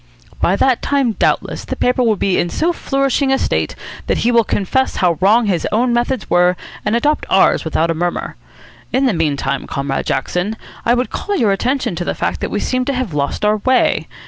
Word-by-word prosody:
"By 180 - +2
that 255 +3 +2
time, 275 -4 +1
doubtless, - - -1
the - - -4
paper 250 +1 +1
will 225 -3 +3
be 195 -1 0
in 175 - 0
so 335 - 0
flourishing 275 -2 0
a 270 - +3
state - - -1 0.3
that - - +1
he 240 - +4
will 235 -1 +4
confess 220 +6 0
how 175 -3 +1
wrong 220 +5 +4
his 185 -5 0
own 240 +3 +2
methods 240 -1 -1
were 180 0 +3 0.3
and 210 +2 0
adopt 295 +6 +1
ours 190 - +3
without 160 +1 0
a - - +1
murmur. 175 +2 -3 0.6
In 260 +3 +2
the 250 - +2
meantime, 140 -5 -1
Comrade 140 0 -3
Jackson, 180 +10 -1 0.3
I 240 - +4
would 250 +1 -1
call 410 - -3
your 225 - +2
attention 250 +3 -1
to 175 - -2
the - - -2
fact - - -2
that - - -3
we - - -2
seem 255 0 -1
to 280 - -1
have 250 -9 -3
lost 140 +7 -1
our 210 +1 +3
way. 255 +4 +1
220 Hz, 210 wpm, -17 LUFS, 175-255 Hz, 0.6 s, he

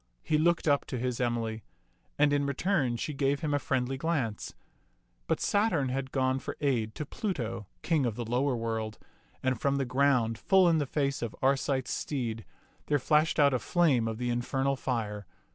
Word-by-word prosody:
He 155 -1 +1
looked 170 +1 +2
up 140 -1 +3
to 130 - -4
his 125 0 -2
Emily, 115 -3 -1 0.5
and 145 0 +4
in 145 0 +1
return 140 -4 0
she 155 +4 -3
gave 140 0 0
him 150 -2 -1
a 145 - +2
friendly 130 -1 -1
glance; 135 -10 -2 0.7
but - - +1
Saturn 200 - +1
had 130 +1 -3
gone 130 -1 +1
for - - -6
aid 120 -7 0
to 150 - -4
Pluto, 120 - -4 0.2
king 155 -6 +2
of 115 - -3
the 120 - -4
lower 125 +3 +1
world, 110 -2 -3 0.5
and 130 -2 0
from 140 0 +2
the 140 -1 0
ground, 125 -3 +2
full 190 -2 +4
in 165 -2 +4
the 145 - -1
face 140 0 -1
of 120 -2 -4
Arcite's 135 -1 +1
steed, 115 -6 -3 0.4
there 145 - +3
flashed 150 +3 +2
out 140 -2 +5
a 130 - +1
flame 135 -3 +2
of 110 -1 -3
the 120 0 -1
in 120 0 0
fernal 135 +2 0
fire. 105 -7 -3
135 Hz, 190 wpm, -29 LUFS, 120-145 Hz, 0.7 s, out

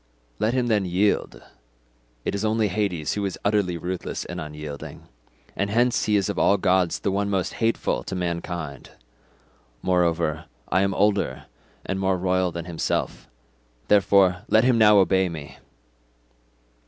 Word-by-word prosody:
Let 110 +4 +1
him 125 -1 +1
then 110 -4 +2
yield; 95 +3 0 0.8
it - - -1
is 100 +1 -2
only 110 -1 +1
Hades 90 -6 -1
who 105 - -2
is 95 -2 -3
utterly 100 -4 +1
ruthless 90 +2 -4
and - - -6
unyielding—and 75 +2 -8
hence 120 +3 +2
he 105 - +2
is 100 -2 +2
of 100 - -2
all 100 - +4
gods 90 -2 +1
the 100 - 0
one 100 +1 -1
most 95 -2 -1
hateful 115 - 0
to 95 - -4
mankind. 85 -5 -4 0.9
Moreover 85 -3 +1 0.2
I 95 - +2
am 100 0 0
older 105 0 +1 0.4
and 95 0 -2
more 95 -1 +1
royal 90 0 +1
than 85 0 -6
himself. 85 -2 -3 0.6
Therefore, 95 -2 +4
let 110 - +4
him 125 -2 +3
now 105 -1 +7
obey 95 -1 +3
me." 75 -5 -9
95 Hz, 145 wpm, -24 LUFS, 85-105 Hz, 0.9 s, now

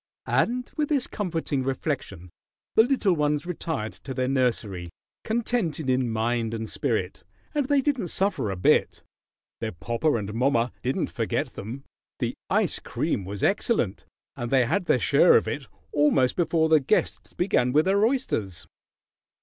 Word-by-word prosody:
And 250 +1 0
with 300 -2 -1
this 280 -5 +1
comforting 165 -8 -2
reflection 130 - -3 0.4
the - - +7
little 230 -6 +2
ones 150 0 0
retired 160 -10 -3
to 130 - -6
their 130 0 0
nursery 115 -9 -1 0.3
contented 215 - -1
in 130 -1 +1
mind 115 0 -1
and 110 0 -4
spirit 110 -10 -2 0.3
and 290 -3 0
they 285 -1 +3
didn't 265 -9 0
suffer 190 - 0
a 95 - -2
bit. 90 - +2 0.6
Their 110 -3 -3
"popper 120 - 0
and 105 -1 -5
mommer" 120 0 +1
didn't 130 +2 -1
forget - - -1
them. 120 +7 -7 0.3
The - - -2 0.2
ice - - +1
cream 95 - -2
was 100 +1 -5
excellent, 195 - +1 0.3
and 120 -1 -4
they 130 -1 +4
had 175 - 0
their 130 - +3
share 120 - +5
of - - -1
it - - -4 0.2
almost 145 -3 +3
before 165 -2 +2
the 160 -1 +5
guests 145 +10 -1
began 125 -9 +1
with 150 +4 +3
their 200 +2 +3
oysters. 110 - -1
135 Hz, 155 wpm, -26 LUFS, 115-185 Hz, 0.6 s, the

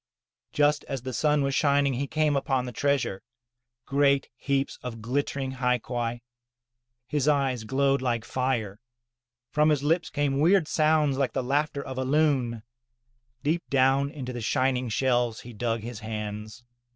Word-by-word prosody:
Just 145 0 +2
as 135 -3 -5
the 130 0 -5
sun 150 +3 +2
was 135 0 0
sinking 140 -2 +3
he 135 +3 -2
came 155 -1 +1
upon 135 -2 0
the 125 - -5
treasure, 135 -6 0 0.6
great 140 0 +2
heaps 140 +2 -1
of 120 -2 -6
glittering 135 +3 -2
hai 125 -1 +1
quai. 120 0 -4 0.8
His 145 +1 -1
eyes 135 -6 +1
glowed 135 +2 +1
like 120 -3 -1
fire; 120 -6 -2 0.7
from 150 +1 +3
his 145 -2 +1
lips 165 +4 +1
came 140 -1 0
weird 170 +1 +4
sounds 155 -3 +2
like 135 - 0
the - - -1
laughter 140 +2 0
of 130 -1 -5
a - - 0
loon; 130 -5 +1 0.8
deep 160 +4 +1
down 135 +1 +3
into 135 -4 -6
the 120 - -5
shining 130 +1 0
shells 120 0 +1
he 120 - -10
dug 115 0 -2
his 115 0 -7
hands. 110 +1 -6
135 Hz, 155 wpm, -27 LUFS, 120-145 Hz, 0.8 s, weird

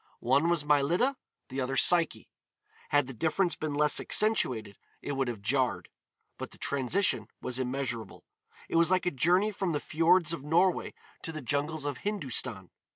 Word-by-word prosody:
One 140 +7 +2
was 170 -4 +1
Mylitta, 155 - +2 0.3
the 130 +1 -3
other 135 +1 -2
Psyche. 170 0 +3 0.6
Had 145 -1 +3
the 135 - -8
difference 165 - 0
been 155 -2 -4
less 150 0 +3
accentuated, 120 - +1 0.2
it - - -5
would 135 -2 -1
have 115 -4 -5
jarred. 130 +3 0 0.5
But - - -5
the - - -17
transition 140 - 0
was 125 0 -2
immeasurable. 125 -4 -4 0.4
It - - -1
was 170 0 +4
like 185 -1 +2
a 180 - +1
journey 180 +10 +2
from 190 -4 -2
the 145 - 0
fjords 165 +1 +2
of 155 -5 -6
Norway 170 +5 +1 0.3
to 160 - -5
the 155 -3 -7
jungles 145 +3 -2
of 145 -3 -3
Hindustan. 130 - -2
145 Hz, 165 wpm, -29 LUFS, 130-170 Hz, 0.6 s, was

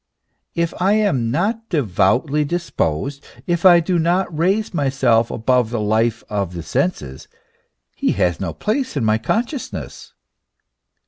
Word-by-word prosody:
If 170 -1 0
I 195 +3 +3
am 140 - +1
not 215 - -1
devoutly 135 - +1
dis 170 +3 -3
posed, 135 - -2 0.2
if 175 0 +3
I 175 -1 +8
do 175 +1 0
not 175 +1 0
raise 190 +7 0
myself 135 -6 +2
above 125 0 +1
the 120 -1 -2
life 110 +2 0
of 100 -4 -3
the 85 - -5
senses, 80 - -2 0.7
he - - 0
has 90 -3 0
no 90 -4 -2
place 220 - -2
in 120 - 0
my 110 0 +2
consciousness. 240 - -4
140 Hz, 140 wpm, -20 LUFS, 110-180 Hz, 0.7 s, I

